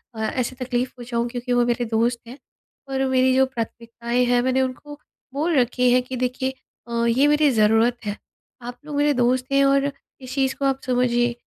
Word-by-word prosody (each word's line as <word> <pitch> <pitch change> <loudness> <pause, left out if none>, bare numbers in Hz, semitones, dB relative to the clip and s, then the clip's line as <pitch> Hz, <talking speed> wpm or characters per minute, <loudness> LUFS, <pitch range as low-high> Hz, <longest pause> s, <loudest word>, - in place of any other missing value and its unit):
अ, - - -8
ऐसे 250 +3 -2
तकलीफ़ 245 0 -1
पहुँचाऊँ 235 -1 -2
क्योंकि 245 0 -3
वो 245 0 +3
मेरे 240 0 0
दोस्त 235 +1 0
हैं। 245 +3 -10 0.5
और 270 0 0
मेरी 260 0 +3
जो 265 0 +5
प्राथमिकताएँ 235 0 -3
हैं 245 0 +2
मैंने 260 +1 +1
उनको 285 +3 -5 0.3
बोल 310 +4 0
रखी 250 0 +2
हैं 250 +1 +4
कि 255 +1 -6
देखिए 255 +1 -2 0.3
अ, 235 0 -1
ये 240 +4 +3
मेरी 295 0 +4
ज़रूरत 225 +1 +3
है। 205 0 -3 0.4
आप 245 +1 -8
लोग 300 -1 -6
मेरे 290 0 +2
दोस्त 250 0 +1
हैं 275 0 +4
और 275 +1 +2 0.3
इस 255 0 -8
चीज़ 265 -1 +1
को 275 - -3
आप 270 -1 +1
समझिए 245 -1 +1
250 Hz, 195 wpm, -22 LUFS, 240-265 Hz, 0.5 s, जो